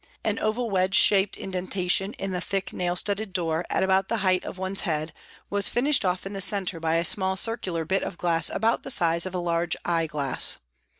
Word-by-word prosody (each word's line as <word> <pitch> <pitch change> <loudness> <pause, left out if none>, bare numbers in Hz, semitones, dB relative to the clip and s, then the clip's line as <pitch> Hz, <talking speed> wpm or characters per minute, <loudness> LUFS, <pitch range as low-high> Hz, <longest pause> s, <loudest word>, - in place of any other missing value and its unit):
An - - -1
oval 225 +1 -1
wedge 185 0 +1
shaped 195 -1 +4
indentation 185 +1 0
in 195 - -5
the 180 -1 -2
thick 195 +1 -3
nail 175 -1 -1
studded 200 +1 -1
door, 165 -2 -1
at - - +1
about 190 0 +2
the 230 - -1
height 185 -1 +2
of - - -7
one's 190 +1 -2
head, 155 -3 -1 0.4
was 200 0 +2
finished 275 +4 +2
off 180 0 -1
in 195 - -6
the 195 - -4
centre 190 -3 +2
by 165 0 0
a 165 +1 +1
small 190 +3 +1
circular 180 -5 -1
bit 190 +4 0
of - - -5
glass 170 -2 +1
about 225 +1 +1
the - - -8
size 170 +1 +2
of 185 - -7
a - - 0
large 170 -1 0
eye 165 -2 0
glass. 140 -4 +1
185 Hz, 215 wpm, -25 LUFS, 170-195 Hz, 0.4 s, shaped